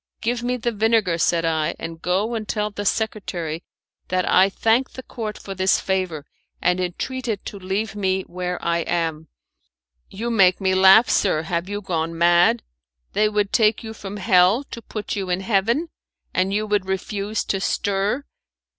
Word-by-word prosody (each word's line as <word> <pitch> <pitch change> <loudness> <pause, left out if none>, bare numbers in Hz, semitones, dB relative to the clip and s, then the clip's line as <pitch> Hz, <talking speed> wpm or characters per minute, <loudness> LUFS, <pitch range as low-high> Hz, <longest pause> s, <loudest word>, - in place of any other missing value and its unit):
"Give 235 +1 -1
me 250 +1 -1
the 235 0 -1
vinegar," 215 -5 +2
said 165 0 +2
I, 160 -1 0
"and 165 0 -7
go 195 +6 0
and 220 -2 -4
tell 210 -1 -1
the 205 0 -5
secretary 180 -7 -2 0.4
that 185 0 0
I 190 +2 +5
thank 225 +6 +1
the 260 - -8
Court 220 -4 -6
for 195 - -7
this 190 0 +2
favour, 185 -6 -2 0.3
and 180 +1 +1
entreat 245 +9 -3
it 215 -4 -3
to 200 - -7
leave 195 +4 -3
me 190 -2 0
where 180 0 -4
I 170 0 +1
am." 165 -2 -2 0.8
"You 230 +5 -4
make 190 -5 +4
me 190 -1 +1
laugh, 190 +5 +7
sir. 160 -6 +2
Have 170 +2 -2
you 205 0 -3
gone 165 -3 -2
mad? 170 -7 +4 0.5
They 215 +1 +3
would 210 -1 -1
take 220 -1 +3
you 220 0 -6
from 205 -1 -7
hell 190 +4 +4
to 235 - -7
put 215 -1 -5
you 195 -2 -3
in 180 +1 0
heaven, 230 - +1 0.4
and 185 +1 +1
you 210 +2 0
would 205 -2 0
refuse 200 +2 -2
to 195 - -1
stir? 200 +6 0
195 Hz, 175 wpm, -22 LUFS, 180-215 Hz, 0.8 s, laugh